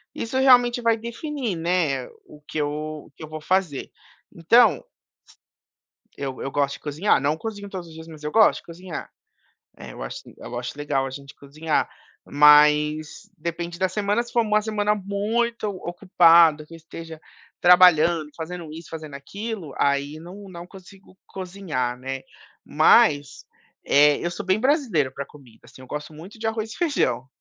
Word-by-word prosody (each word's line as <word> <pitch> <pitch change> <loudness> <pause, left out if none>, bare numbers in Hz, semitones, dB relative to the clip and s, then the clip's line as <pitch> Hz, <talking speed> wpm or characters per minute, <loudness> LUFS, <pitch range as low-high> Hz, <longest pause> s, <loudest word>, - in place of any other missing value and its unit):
isso, 230 +3 -3
realmente, 245 -2 +5
vai 230 -1 +3
definir, 235 - -4
né, 165 -6 0 0.2
o 150 - -16
que 155 - -4
eu 150 +1 -4
o - - -23
que - - -11
eu 155 - -9
vou 155 0 -7
fazer. 180 -4 -1 0.4
Então... 200 +9 +4 1.3
Eu 135 -2 -5
eu 135 - -4
gosto 140 0 0
de - - -12
cozinhar, 155 +7 +1
não 145 +2 0
cozinho 205 +2 -7
todos 185 -3 -7
os 160 - -13
dias, 160 0 -11
mas 155 -2 -12
eu 150 0 -4
gosto 220 -1 +4
de - - -30
cozinhar. 170 0 -8 0.7
É, - - -10
eu - - -9
acho - - -7 0.2
eu 120 - -7
acho 125 +3 -6
legal 145 -2 -1
a - - -5
gente 140 +1 -10
cozinhar, 155 +3 -2 0.4
mas 150 +4 +4
depende 170 +2 -5
da 190 - +1
semana, 205 +4 0
se 240 - -13
for 235 - +3
uma 215 -1 +2
semana 210 -1 0
muito 215 +3 -2
ocupada 170 -4 +4
que 165 - -13
eu - - -8
esteja 165 0 -10 0.4
trabalhando, 175 -3 +5
fazendo 165 -1 -7
isso, 160 0 -10
fazendo 155 -3 -8
aquilo, 195 +3 -7
aí 140 +1 +1
não 190 +5 -11
não 175 -1 -9
consigo 190 0 -16
cozinhar 175 -10 -4
né, 135 +1 -5 0.4
mas, 145 - +3 0.4
eh, 145 +1 +5
eu 175 - -1
sou 190 +4 -6
bem 190 +1 +2
brasileiro 240 - +1
para 140 - -5
comida, 130 -6 -18
assim, 130 - -15
eu - - -13
gosto 150 +3 -6
muito 180 +9 -12
de 220 - -4
arroz 220 0 -3
e - - -10
feijão. 130 - 0
170 Hz, 170 wpm, -23 LUFS, 150-205 Hz, 1.3 s, realmente